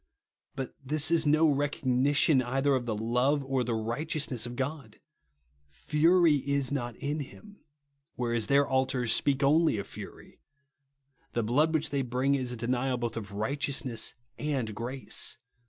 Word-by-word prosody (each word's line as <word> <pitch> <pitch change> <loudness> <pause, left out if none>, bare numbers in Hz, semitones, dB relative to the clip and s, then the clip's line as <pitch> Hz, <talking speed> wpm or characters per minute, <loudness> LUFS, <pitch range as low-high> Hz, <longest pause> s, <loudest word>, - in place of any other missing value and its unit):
But 135 -1 -5
this 150 +4 +1
is 165 -2 +3
no 155 +2 +5
recognition 140 0 +2
either 135 +3 +1
of 125 -2 -1
the 110 - -1
love 125 +6 +1
or 135 -1 0
the 120 -1 -1
righteousness 125 +2 -2
of 120 - -7
God. 130 -4 -5 0.4
" 70 +1 -41
Fury 160 - +3
is 140 0 -1
not 120 -5 -3
in 145 +2 -3
him 205 +9 -10 0.3
;" 140 +3 -44
whereas 120 -3 0
their 140 0 +4
altars 130 -3 +1
speak 140 +3 +2
only 155 -2 +4
of 100 - -4
fury. - - -11 0.9
The 120 - 0
blood 145 +9 +2
which 160 -1 -1
they 140 -1 0
bring 130 +2 0
is 130 -3 -1
a - - -4
denial 125 +2 -1
both 120 -1 -3
of 100 -3 -6
righteousness 130 +2 -1 0.2
and 135 -7 -2
grace. 120 +5 -3
135 Hz, 155 wpm, -29 LUFS, 120-145 Hz, 0.9 s, no